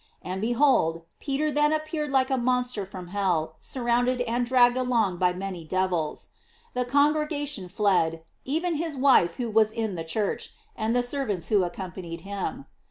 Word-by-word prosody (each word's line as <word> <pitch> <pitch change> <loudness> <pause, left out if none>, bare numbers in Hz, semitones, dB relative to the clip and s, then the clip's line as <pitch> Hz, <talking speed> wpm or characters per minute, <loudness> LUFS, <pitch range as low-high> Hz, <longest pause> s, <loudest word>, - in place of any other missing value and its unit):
And, 185 +1 -4
behold, 230 - +2 0.2
Peter 300 +2 -1
then 295 +1 +3
appeared 310 -1 -2
like 265 0 +2
a - - +3
monster 250 -4 0
from 185 -2 -9
hell, 175 -5 -1
surrounded 245 0 0
and 240 0 0
dragged 245 -1 +5
along 235 -8 +1
by 180 -1 +3
many 185 -1 -5
devils. 175 -2 -1 0.4
The 250 0 -1
con 285 +4 +4
gregation 290 - -3
fled, 175 -5 +1 0.2
even 325 +4 -1
his 315 -2 -3
wife 255 -10 +4
who 240 -3 -3
was 215 0 +4
in 220 -2 -2
the 165 -2 -4
church, 200 +6 -3 0.2
and 225 +1 -1
the 245 - +3
servants 245 - -2
who 205 -3 +4
accompanied 175 -1 -6
him. 200 +7 -5
235 Hz, 165 wpm, -26 LUFS, 185-265 Hz, 0.4 s, dragged